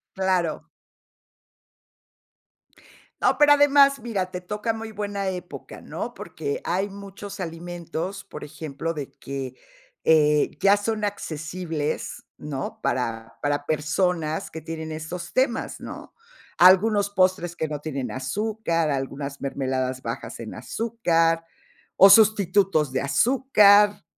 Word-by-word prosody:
Claro. 185 Hz, -4 st, 0 dB, 2.6 s
No, -, -, +2 dB
pero 295 Hz, -1 st, +7 dB
además, 280 Hz, -1 st, +5 dB
mira, 195 Hz, -6 st, -3 dB
te 180 Hz, -, -5 dB
toca 210 Hz, +5 st, -2 dB
muy 225 Hz, 0 st, -7 dB
buena 200 Hz, -2 st, -3 dB
época, 180 Hz, -1 st, -8 dB
¿no? -, -, -6 dB
Porque 430 Hz, +3 st, -5 dB
hay 195 Hz, +3 st, -1 dB
muchos 200 Hz, 0 st, -9 dB
alimentos, 175 Hz, +2 st, -5 dB
por 150 Hz, -, -10 dB
ejemplo, 155 Hz, +1 st, -5 dB
de 145 Hz, -3 st, -6 dB
que, 135 Hz, -2 st, -6 dB, 0.5 s
eh, 150 Hz, -2 st, +4 dB
ya 200 Hz, +1 st, +5 dB
son 215 Hz, +1 st, -2 dB
accesibles, 165 Hz, -5 st, -4 dB, 0.2 s
¿no?, 140 Hz, -3 st, -5 dB
para 115 Hz, -2 st, -2 dB
para 145 Hz, 0 st, -1 dB
personas 155 Hz, +1 st, 0 dB
que 160 Hz, -, -7 dB
tienen 160 Hz, 0 st, -6 dB
estos 165 Hz, +3 st, -6 dB
temas, 255 Hz, -3 st, 0 dB
¿no? -, -, -9 dB, 0.4 s
Algunos 200 Hz, +3 st, +5 dB
postres 185 Hz, -3 st, +1 dB
que 160 Hz, -, -2 dB
no 150 Hz, -1 st, -4 dB
tienen 140 Hz, -5 st, -4 dB
azúcar, 165 Hz, -, -1 dB
algunas 140 Hz, 0 st, -4 dB
mermeladas 130 Hz, -2 st, -2 dB
bajas 115 Hz, +2 st, -6 dB
en 115 Hz, -2 st, -7 dB
azúcar, 165 Hz, -, 0 dB, 0.5 s
o 195 Hz, -, +9 dB
sustitutos 195 Hz, -, +4 dB
de 130 Hz, -, -1 dB
azúcar, 205 Hz, -, +4 dB
175 Hz, 115 wpm, -24 LUFS, 150-205 Hz, 2.6 s, o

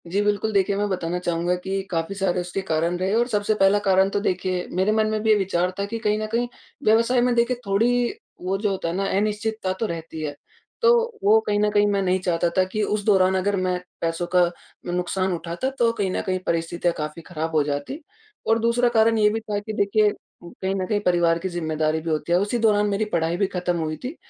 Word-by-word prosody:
जी, 195 Hz, +4 st, 0 dB
बिल्कुल 210 Hz, +1 st, 0 dB
देखिए 195 Hz, 0 st, +2 dB
मैं 205 Hz, 0 st, 0 dB
बताना 175 Hz, -2 st, -2 dB
चाहूँगा 175 Hz, 0 st, 0 dB
कि 195 Hz, 0 st, -2 dB
काफ़ी 165 Hz, +2 st, -2 dB
सारे 185 Hz, -2 st, 0 dB
उसके 180 Hz, +2 st, -4 dB
कारण 165 Hz, +2 st, 0 dB
रहे 190 Hz, +2 st, -1 dB
और 240 Hz, +1 st, +2 dB
सबसे 210 Hz, -2 st, 0 dB
पहला 195 Hz, 0 st, +4 dB
कारण 190 Hz, -1 st, +3 dB
तो 205 Hz, -, -1 dB
देखिए, 185 Hz, -2 st, -1 dB
मेरे 190 Hz, +3 st, +1 dB
मन 215 Hz, 0 st, +2 dB
में 215 Hz, 0 st, -1 dB
भी 220 Hz, -, +1 dB
ये 215 Hz, -, +7 dB
विचार 180 Hz, -2 st, 0 dB
था 200 Hz, -, 0 dB
कि 225 Hz, +3 st, -4 dB
कहीं 210 Hz, -1 st, +1 dB
न 215 Hz, -, -3 dB
कहीं 235 Hz, +2 st, -1 dB, 0.4 s
व्यवसाय 230 Hz, +2 st, +3 dB
में 245 Hz, 0 st, +2 dB
देखिए 235 Hz, +1 st, +2 dB
थोड़ी 240 Hz, -, +2 dB, 0.3 s
वो 185 Hz, +2 st, -1 dB
जो 205 Hz, +1 st, 0 dB
होता 190 Hz, -3 st, -3 dB
है -, -, -3 dB
ना, 195 Hz, +1 st, -1 dB
अनिश्चितता 210 Hz, -1 st, -1 dB
तो 205 Hz, +4 st, -3 dB
रहती 165 Hz, -4 st, -6 dB
है 145 Hz, -2 st, -4 dB, 0.5 s
तो 470 Hz, 0 st, +6 dB, 0.3 s
वो 215 Hz, +2 st, +6 dB
कहीं 205 Hz, 0 st, +1 dB
न 210 Hz, 0 st, +3 dB
कहीं 205 Hz, 0 st, +3 dB
मैं 200 Hz, -1 st, +1 dB
नहीं 185 Hz, 0 st, +1 dB
चाहता 175 Hz, -2 st, 0 dB
था 185 Hz, -, +5 dB
कि 215 Hz, -, -1 dB
उस 210 Hz, 0 st, -1 dB
दौरान 190 Hz, -3 st, +4 dB
अगर 200 Hz, +2 st, 0 dB
मैं 185 Hz, -1 st, 0 dB, 0.2 s
पैसों 165 Hz, +1 st, -1 dB
का 180 Hz, -, +6 dB, 0.5 s
नुकसान 180 Hz, +1 st, -1 dB
उठाता 170 Hz, +9 st, -3 dB
तो 235 Hz, -1 st, +4 dB
कहीं 200 Hz, -4 st, -1 dB
न -, -, -1 dB
कहीं 185 Hz, -1 st, -1 dB
परिस्थितियाँ 170 Hz, +1 st, 0 dB
काफ़ी 150 Hz, +2 st, -5 dB
ख़राब 160 Hz, -1 st, -4 dB
हो 155 Hz, -, +5 dB
जातीं। 145 Hz, -, -3 dB, 0.5 s
और 225 Hz, +1 st, +3 dB
दूसरा 235 Hz, +2 st, +2 dB
कारण 225 Hz, -1 st, +3 dB
ये 210 Hz, -1 st, +4 dB
भी 220 Hz, +2 st, -1 dB
था 210 Hz, -2 st, -3 dB
कि 215 Hz, +1 st, -6 dB
देखिए, 210 Hz, +1 st, +3 dB, 0.3 s
कहीं 190 Hz, +2 st, -4 dB
न 190 Hz, -1 st, -1 dB
कहीं 210 Hz, +1 st, +1 dB
परिवार 175 Hz, -1 st, +3 dB
की 190 Hz, -, -3 dB
ज़िम्मेदारी 160 Hz, -2 st, -1 dB
भी 165 Hz, -, -4 dB
होती 155 Hz, +2 st, -2 dB
है, 175 Hz, -, +5 dB
उसी 205 Hz, +5 st, 0 dB
दौरान 210 Hz, -2 st, +3 dB
मेरी 205 Hz, +2 st, 0 dB
पढ़ाई 165 Hz, 0 st, +1 dB
भी 195 Hz, -, +1 dB
ख़त्म 180 Hz, -1 st, -2 dB
हुई 155 Hz, -1 st, -3 dB
थी 260 Hz, +6 st, -5 dB
195 Hz, 230 wpm, -23 LUFS, 175-215 Hz, 0.5 s, ये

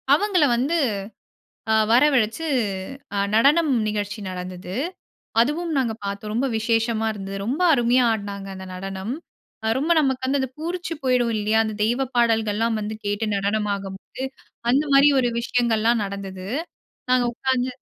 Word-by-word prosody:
அவங்கள 365 Hz, +1 st, +3 dB
வந்து, 270 Hz, +8 st, 0 dB, 1.0 s
ஆ -, -, +4 dB, 0.2 s
வரவழைச்சு, 255 Hz, +1 st, +3 dB, 0.7 s
அ -, -, 0 dB, 0.2 s
நடனம் 290 Hz, +7 st, +4 dB, 0.2 s
நிகழ்ச்சி 205 Hz, 0 st, -3 dB
நடந்தது. 180 Hz, 0 st, -6 dB, 0.7 s
அதுவும் 320 Hz, +7 st, 0 dB
நாங்க 245 Hz, -4 st, +1 dB
பார்த்தோம். 200 Hz, +1 st, -4 dB
ரொம்ப 245 Hz, +5 st, +1 dB
விசேஷமா 225 Hz, 0 st, +1 dB
இருந்தது. 195 Hz, -1 st, -6 dB
ரொம்ப 270 Hz, +10 st, -1 dB
அருமையா 245 Hz, -1 st, +3 dB
ஆட்னாங்க, 200 Hz, -2 st, -5 dB
அந்த 190 Hz, 0 st, -8 dB
நடனம். 195 Hz, +4 st, -5 dB, 0.5 s
அ -, -, +1 dB
ரொம்ப 310 Hz, +5 st, 0 dB
நமக்கு 265 Hz, -3 st, 0 dB
வந்து 275 Hz, +2 st, +1 dB
அந்த 265 Hz, -, -2 dB
பூரிச்சி 345 Hz, +2 st, -3 dB
போயிடுவோம் 250 Hz, -3 st, +2 dB
இல்லயா! 215 Hz, +1 st, +2 dB
அந்த 220 Hz, -1 st, -3 dB
தெய்வப் 245 Hz, +4 st, 0 dB
பாடல்கள்லாம் 225 Hz, -1 st, +2 dB
வந்து 215 Hz, +1 st, -4 dB
கேட்டு 205 Hz, +2 st, -1 dB
நடனம் 205 Hz, +2 st, 0 dB
ஆடும்போது 195 Hz, +5 st, -8 dB, 0.5 s
அந்த 275 Hz, +4 st, +3 dB
மாதிரி 275 Hz, +2 st, +7 dB
ஒரு 245 Hz, -2 st, +2 dB
விஷயங்கள்லாம் 235 Hz, -1 st, +1 dB
நடந்தது. 195 Hz, -1 st, -6 dB, 0.7 s
நாங்க 255 Hz, -1 st, +4 dB
உட்காந்து 260 Hz, 0 st, 0 dB
230 Hz, 140 wpm, -23 LUFS, 205-265 Hz, 1.0 s, மாதிரி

